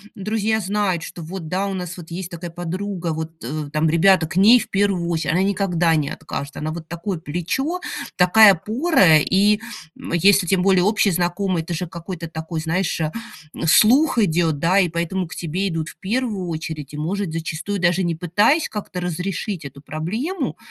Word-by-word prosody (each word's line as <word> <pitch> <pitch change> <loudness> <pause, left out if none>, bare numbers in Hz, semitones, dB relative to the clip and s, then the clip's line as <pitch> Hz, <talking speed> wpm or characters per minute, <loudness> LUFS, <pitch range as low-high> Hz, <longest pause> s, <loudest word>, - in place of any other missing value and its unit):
друзья 215 +2 -1
знают, 195 -3 -1
что 175 - -8
вот, 165 +1 -7
да, 190 +3 -1
у 195 - -3
нас 180 -1 -5
вот 170 -2 -10
есть 175 +1 -5
такая 170 0 -7
подруга, 175 0 -4
вот, 160 +1 -7
э, 145 +4 -4
там, 155 +1 +2
ребята 170 +1 +4
к 170 - -6
ней 220 +6 +7
в - - -6
первую 195 -4 0
очередь, 165 -3 -1
она 180 +3 +2
никогда 185 -4 +1
не 150 -2 0
откажет, 140 0 -6
она 155 +1 -3
вот 165 0 -7
такое 170 +2 -4
плечо, 180 - -3 0.3
такая 200 +3 +7
опора. 210 - +3
И, 200 +6 +3 0.4
м, - - -7
если 190 +2 +4
тем 185 +1 +2
более 190 -1 +4
общий 210 0 +2
знакомый, 175 0 0
это 170 - -5
же 170 +2 -3
какой-то 170 0 -7
такой, 160 0 -5
знаешь, 165 +2 -1 0.6
слух 245 - +5
идет, 165 -7 +2
да, 180 +5 +3
и 185 - +3
поэтому 170 +2 -2
к 165 - -9
тебе 180 +4 -2
идут 165 -3 -3
в - - -14
первую 210 -3 -2
очередь, 155 -3 -5
и, - - -6
может, 180 +4 -2
зачастую 165 +4 -3
даже 180 +1 +2
не 170 -2 -1
пытаясь 205 - +2
как-то 200 -4 -5
разрешить 180 +1 -3
эту 140 0 -10
проблему, 225 - -3
180 Hz, 185 wpm, -21 LUFS, 165-200 Hz, 0.6 s, ней